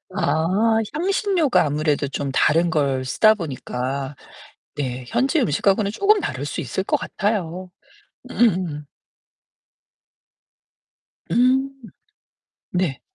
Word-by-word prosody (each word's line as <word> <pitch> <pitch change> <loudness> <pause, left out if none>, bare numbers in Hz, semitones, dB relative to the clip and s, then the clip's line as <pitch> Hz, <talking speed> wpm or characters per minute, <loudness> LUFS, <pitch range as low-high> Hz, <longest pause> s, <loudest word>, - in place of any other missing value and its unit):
아, 190 +5 +1 0.2
향신료가 360 - +1
아무래도 150 -1 0
좀 140 0 -3
다른 165 +5 +3
걸 140 -5 0
쓰다 215 - +4
보니까 135 - -4 0.6
네 130 -3 -4
현지 270 - +1
음식하고는 200 - +1
쪼금 405 - +3
다를 130 - -4
수 145 - -4
있을 155 +5 -3
것 - - +1
같아요. 185 -4 -3 0.6
음음. 180 -10 +1 2.5
음. 260 +3 +3 1.0
네. 180 -7 -1
175 Hz, 185 characters per minute, -22 LUFS, 145-225 Hz, 2.5 s, 쓰다